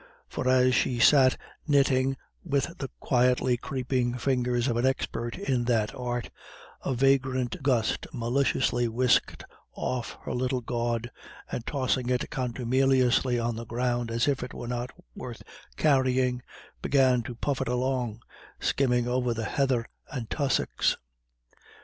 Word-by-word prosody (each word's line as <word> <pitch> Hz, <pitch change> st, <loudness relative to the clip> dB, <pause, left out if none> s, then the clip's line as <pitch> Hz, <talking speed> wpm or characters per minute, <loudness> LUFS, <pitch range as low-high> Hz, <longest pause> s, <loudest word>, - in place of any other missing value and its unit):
For 130 Hz, -, -2 dB
as 130 Hz, 0 st, +4 dB
she 125 Hz, 0 st, +1 dB
sat 130 Hz, +1 st, +6 dB, 0.3 s
knitting 135 Hz, -2 st, +3 dB, 0.3 s
with 145 Hz, +1 st, -1 dB
the 135 Hz, -, -4 dB
quietly 125 Hz, 0 st, +2 dB
creeping 125 Hz, -1 st, -1 dB
fingers 125 Hz, -1 st, 0 dB
of 120 Hz, -, 0 dB
an 120 Hz, -, +1 dB
expert 120 Hz, -3 st, -2 dB
in 130 Hz, -11 st, 0 dB
that 115 Hz, -3 st, +1 dB
art, 120 Hz, -2 st, -4 dB, 0.5 s
a 130 Hz, -, -1 dB
vagrant 130 Hz, +2 st, +1 dB
gust 125 Hz, -5 st, +1 dB
maliciously 120 Hz, 0 st, +1 dB
whisked 125 Hz, +2 st, +1 dB, 0.3 s
off 125 Hz, -2 st, -3 dB
her -, -, -4 dB
little 125 Hz, +1 st, -1 dB
gawd, 120 Hz, 0 st, -2 dB, 0.4 s
and 120 Hz, -, -4 dB
tossing 130 Hz, -3 st, 0 dB
it 125 Hz, -1 st, -1 dB
contumeliously 130 Hz, 0 st, +2 dB
on 120 Hz, 0 st, -1 dB
the 115 Hz, +1 st, -6 dB
ground, 120 Hz, 0 st, -1 dB
as 115 Hz, +2 st, 0 dB
if 140 Hz, -2 st, +1 dB
it 125 Hz, -, -6 dB
were 120 Hz, -, -6 dB
not 120 Hz, +1 st, -3 dB, 0.3 s
worth -, -, -8 dB, 0.3 s
carrying, 130 Hz, -3 st, +2 dB, 0.4 s
began 130 Hz, -, +3 dB
to 120 Hz, +1 st, -7 dB
puff 135 Hz, +3 st, -2 dB
it 135 Hz, -, -1 dB
along, 125 Hz, -2 st, -1 dB, 0.4 s
skimming 125 Hz, -3 st, +1 dB
over 125 Hz, -1 st, 0 dB
the 110 Hz, 0 st, -3 dB
heather 130 Hz, -2 st, +1 dB, 0.3 s
and 125 Hz, -5 st, -5 dB
tussocks. 140 Hz, -2 st, +1 dB
125 Hz, 135 wpm, -27 LUFS, 120-130 Hz, 0.5 s, sat